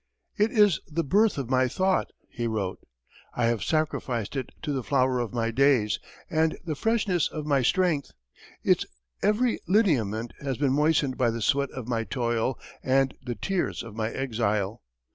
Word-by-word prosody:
"It 210 Hz, +2 st, +2 dB
is 210 Hz, -7 st, +4 dB
the 165 Hz, +2 st, -1 dB
birth 205 Hz, +6 st, +3 dB
of 135 Hz, -4 st, -3 dB
my 130 Hz, 0 st, +3 dB
thought," 190 Hz, +8 st, +1 dB, 0.2 s
he 120 Hz, -1 st, -3 dB
wrote. 100 Hz, -4 st, -2 dB, 0.6 s
"I 120 Hz, -, +1 dB
have 115 Hz, -2 st, +1 dB
sacrificed 135 Hz, -8 st, -1 dB
to 140 Hz, -, -1 dB
it 130 Hz, -, -7 dB
the 140 Hz, -4 st, -1 dB
flower 130 Hz, -1 st, +1 dB
of 120 Hz, -3 st, -2 dB
my 115 Hz, -1 st, -1 dB
days, 125 Hz, -4 st, +3 dB, 0.3 s
and 160 Hz, 0 st, +1 dB
the 160 Hz, -, -1 dB
freshness 200 Hz, -2 st, +1 dB
of 155 Hz, -2 st, -6 dB
my 140 Hz, -3 st, +2 dB
strength; 165 Hz, +1 st, +1 dB, 0.5 s
its -, -, +3 dB, 0.4 s
every 220 Hz, +4 st, +2 dB
lineament 120 Hz, -, +2 dB
has 135 Hz, -3 st, -2 dB
been 140 Hz, -2 st, +2 dB
moistened 150 Hz, -2 st, +2 dB
by 125 Hz, -2 st, +3 dB
the 115 Hz, 0 st, -3 dB
sweat 140 Hz, +3 st, +2 dB
of 130 Hz, -3 st, -7 dB
my 115 Hz, -2 st, 0 dB
toil 120 Hz, 0 st, -1 dB, 0.2 s
and 135 Hz, 0 st, +2 dB
the 125 Hz, -2 st, -4 dB
tears 190 Hz, -, -2 dB
of 115 Hz, -3 st, -10 dB
my 110 Hz, -1 st, -1 dB
exile. 110 Hz, -5 st, -1 dB
135 Hz, 170 wpm, -27 LUFS, 115-160 Hz, 0.6 s, is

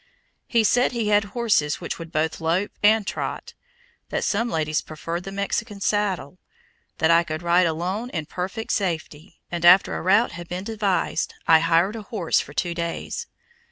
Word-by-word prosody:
He 230 Hz, -2 st, +3 dB
said 245 Hz, +4 st, +3 dB
he 230 Hz, -3 st, -1 dB
had 205 Hz, -1 st, +3 dB
horses 205 Hz, -10 st, +1 dB
which 170 Hz, -, -5 dB
would 165 Hz, -1 st, -8 dB
both 160 Hz, 0 st, -1 dB
"lope" 170 Hz, +5 st, 0 dB
and 210 Hz, 0 st, +4 dB
trot, -, -, -4 dB, 0.6 s
that -, -, -2 dB
some 230 Hz, +3 st, 0 dB
ladies 155 Hz, -3 st, 0 dB
preferred 165 Hz, +3 st, -6 dB
the 195 Hz, -, -6 dB
Mexican 200 Hz, +2 st, -3 dB
saddle, 195 Hz, -5 st, -1 dB, 0.6 s
that 160 Hz, +1 st, +3 dB
I 170 Hz, +1 st, +5 dB
could 160 Hz, 0 st, -5 dB
ride 175 Hz, +1 st, +4 dB
alone 185 Hz, +9 st, -2 dB
in 160 Hz, -9 st, -4 dB
perfect 190 Hz, +8 st, -4 dB
safety; 165 Hz, -3 st, -3 dB
and 175 Hz, -1 st, -3 dB
after 180 Hz, +2 st, +6 dB
a -, -, -3 dB
route 200 Hz, +6 st, +3 dB
had 170 Hz, -1 st, -8 dB
been 180 Hz, +1 st, -4 dB
devised, 205 Hz, -3 st, -1 dB
I 160 Hz, -1 st, +7 dB
hired 165 Hz, +5 st, +2 dB
a 225 Hz, -, -5 dB
horse 200 Hz, -4 st, 0 dB
for -, -, -6 dB
two 175 Hz, -1 st, -1 dB
days. 170 Hz, -1 st, -4 dB
180 Hz, 175 wpm, -23 LUFS, 165-210 Hz, 0.6 s, I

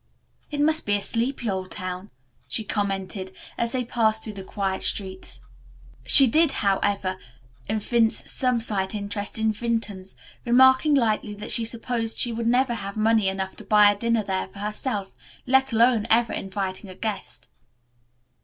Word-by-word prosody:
"It 290 Hz, -, -5 dB
must 315 Hz, -1 st, +1 dB
be 205 Hz, -, +3 dB
a -, -, 0 dB
sleepy 240 Hz, +1 st, -2 dB
old 190 Hz, -2 st, -3 dB
town," 185 Hz, +2 st, -6 dB, 0.4 s
she 220 Hz, -, -2 dB
commented, 195 Hz, -2 st, -3 dB, 0.2 s
as 235 Hz, -1 st, -1 dB
they 250 Hz, -1 st, -1 dB
passed 220 Hz, -2 st, +1 dB
through 215 Hz, -, -5 dB
the 195 Hz, -1 st, -8 dB
quiet 190 Hz, -1 st, -3 dB
streets. 190 Hz, -2 st, -2 dB, 0.7 s
She 275 Hz, -, +8 dB
did, 310 Hz, +5 st, +3 dB
however, 195 Hz, -1 st, 0 dB, 0.5 s
evince 225 Hz, +1 st, +1 dB
some 250 Hz, -2 st, +2 dB
slight 200 Hz, -2 st, -1 dB
interest 205 Hz, 0 st, -4 dB
in 220 Hz, 0 st, +1 dB
Vinton's, 210 Hz, -4 st, -3 dB, 0.3 s
remarking 260 Hz, +4 st, +5 dB
lightly 215 Hz, -4 st, 0 dB
that 205 Hz, -, -7 dB
she 230 Hz, -, +2 dB
supposed 230 Hz, 0 st, -2 dB
she 240 Hz, -, +2 dB
would 230 Hz, 0 st, -2 dB
never 245 Hz, +1 st, +2 dB
have 200 Hz, -2 st, -6 dB
money 220 Hz, -1 st, +3 dB
enough 190 Hz, 0 st, -3 dB
to -, -, -10 dB
buy 210 Hz, -1 st, +6 dB
a -, -, -3 dB
dinner 230 Hz, +1 st, 0 dB
there 190 Hz, -1 st, -2 dB
for 190 Hz, +1 st, -17 dB
herself, 210 Hz, 0 st, -3 dB, 0.3 s
let 265 Hz, +1 st, +3 dB
alone 230 Hz, -1 st, +3 dB
ever 230 Hz, 0 st, +3 dB
inviting 190 Hz, 0 st, -4 dB
a 185 Hz, -, -10 dB
guest. 215 Hz, 0 st, -5 dB
215 Hz, 160 wpm, -24 LUFS, 195-235 Hz, 0.7 s, She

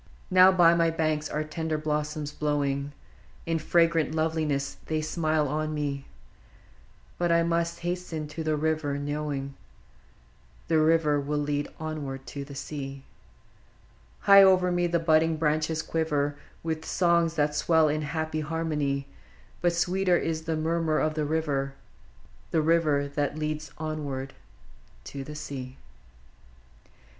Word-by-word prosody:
Now 185 Hz, +1 st, +8 dB
by 175 Hz, -3 st, +6 dB
my 165 Hz, -1 st, +3 dB
banks 155 Hz, -2 st, -1 dB
are 150 Hz, -, -1 dB
tender 155 Hz, 0 st, -3 dB
blossoms 150 Hz, -1 st, -2 dB
blowing: 145 Hz, -2 st, -1 dB, 0.5 s
In 165 Hz, -1 st, 0 dB
fragrant 165 Hz, -1 st, +2 dB
loveliness 155 Hz, -3 st, -1 dB
they 155 Hz, -1 st, 0 dB
smile 155 Hz, -1 st, 0 dB
on 155 Hz, +2 st, -2 dB
me, 140 Hz, -2 st, -3 dB, 0.5 s
— -, -, -29 dB
But 175 Hz, -1 st, +1 dB
I 170 Hz, 0 st, +4 dB
must 170 Hz, 0 st, -1 dB
hasten 175 Hz, -3 st, -3 dB
to 160 Hz, +2 st, -5 dB
the 155 Hz, -1 st, +1 dB
river, 155 Hz, -2 st, 0 dB
knowing 145 Hz, -1 st, -3 dB, 1.2 s
The 160 Hz, -1 st, +4 dB
river 155 Hz, -2 st, +3 dB
leadeth 145 Hz, 0 st, -2 dB
ever 155 Hz, -4 st, -4 dB
to 135 Hz, +1 st, -7 dB
the 140 Hz, 0 st, -10 dB
sea. 135 Hz, -1 st, -6 dB, 1.2 s
High 200 Hz, 0 st, +8 dB
over 185 Hz, -2 st, +5 dB
me 175 Hz, 0 st, +1 dB
the 170 Hz, 0 st, +1 dB
budding 160 Hz, -1 st, +3 dB
branches 155 Hz, +1 st, 0 dB
quiver 145 Hz, -3 st, 0 dB, 0.3 s
W;th 160 Hz, -1 st, -2 dB
songs 170 Hz, -2 st, +2 dB
that 150 Hz, -1 st, +1 dB
swell 160 Hz, +1 st, +3 dB
in 155 Hz, +1 st, 0 dB
happy 155 Hz, +1 st, -2 dB
harmony; 150 Hz, -3 st, -1 dB, 0.6 s
But 175 Hz, -1 st, +2 dB
sweeter 180 Hz, +1 st, +2 dB
is 160 Hz, -1 st, -2 dB
the 160 Hz, -1 st, -1 dB
murmur 160 Hz, 0 st, 0 dB
of 155 Hz, 0 st, +1 dB
the 155 Hz, -1 st, -1 dB
river, 145 Hz, -3 st, -1 dB, 0.4 s
— -, -, -28 dB
The 160 Hz, -, +1 dB
river 155 Hz, -3 st, +2 dB
that 145 Hz, +1 st, -2 dB
leads 155 Hz, 0 st, -3 dB
ever 145 Hz, -4 st, -4 dB, 0.7 s
to 140 Hz, -1 st, -7 dB
the 150 Hz, +2 st, -8 dB
sea! 135 Hz, -3 st, -7 dB
155 Hz, 135 wpm, -27 LUFS, 145-165 Hz, 1.2 s, Now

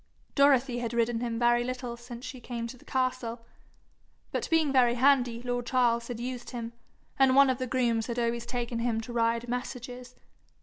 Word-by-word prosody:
Dorothy 270 Hz, -3 st, +4 dB
had 235 Hz, -1 st, -3 dB
ridden 235 Hz, 0 st, +1 dB
him 235 Hz, -1 st, -2 dB
very 240 Hz, 0 st, +3 dB
little 250 Hz, -1 st, -4 dB
since 240 Hz, +1 st, -9 dB
she 260 Hz, -, -7 dB
came 235 Hz, -1 st, -4 dB
to 235 Hz, -, -7 dB
the 250 Hz, -, -19 dB
castle, 255 Hz, -3 st, -2 dB, 0.9 s
but -, -, -2 dB
being 315 Hz, -4 st, +3 dB
very 245 Hz, -2 st, +4 dB
handy, 245 Hz, -2 st, +3 dB
lord 245 Hz, 0 st, -2 dB
Charles 235 Hz, -2 st, +2 dB
had 240 Hz, -2 st, -5 dB
used 245 Hz, 0 st, -5 dB
him, 235 Hz, -2 st, -6 dB, 0.5 s
and 265 Hz, -1 st, +5 dB
one 275 Hz, -1 st, +7 dB
of 255 Hz, -, -3 dB
the 255 Hz, -, -2 dB
grooms 235 Hz, -3 st, +1 dB
had 235 Hz, -1 st, -4 dB
always 235 Hz, 0 st, -1 dB
taken 240 Hz, -1 st, -3 dB
him 230 Hz, -1 st, 0 dB
to 235 Hz, +2 st, -8 dB
ride 230 Hz, 0 st, +1 dB
messages. 250 Hz, 0 st, -5 dB
245 Hz, 185 wpm, -29 LUFS, 235-255 Hz, 0.9 s, one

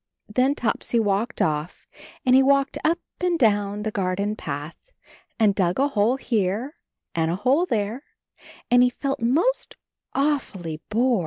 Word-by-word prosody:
Then 255 Hz, +6 st, +1 dB
Topsy 235 Hz, -1 st, 0 dB
walked 210 Hz, +2 st, 0 dB
off 150 Hz, +2 st, -2 dB, 0.4 s
and 255 Hz, -, +4 dB
he 265 Hz, -, +7 dB
walked 275 Hz, 0 st, +2 dB
up 330 Hz, +2 st, +2 dB, 0.2 s
and 355 Hz, -1 st, +1 dB
down 205 Hz, -4 st, +1 dB
the 215 Hz, -, -2 dB
garden 200 Hz, +1 st, -1 dB
path, 150 Hz, -, -7 dB, 0.5 s
and 215 Hz, -3 st, +4 dB
dug 180 Hz, -3 st, 0 dB
a 275 Hz, +2 st, +2 dB
hole 230 Hz, 0 st, +2 dB
here 225 Hz, +1 st, -1 dB, 0.4 s
and 160 Hz, -1 st, 0 dB
a 170 Hz, -, 0 dB
hole 265 Hz, -, +2 dB
there, 220 Hz, -, -1 dB, 0.7 s
and 245 Hz, 0 st, +6 dB
he 250 Hz, -, +5 dB
felt 275 Hz, +1 st, -3 dB
most 325 Hz, -, +1 dB, 0.4 s
aw 290 Hz, +1 st, +2 dB
fully 165 Hz, -, -8 dB
bored. 235 Hz, +1 st, +2 dB
225 Hz, 155 wpm, -24 LUFS, 200-270 Hz, 0.7 s, he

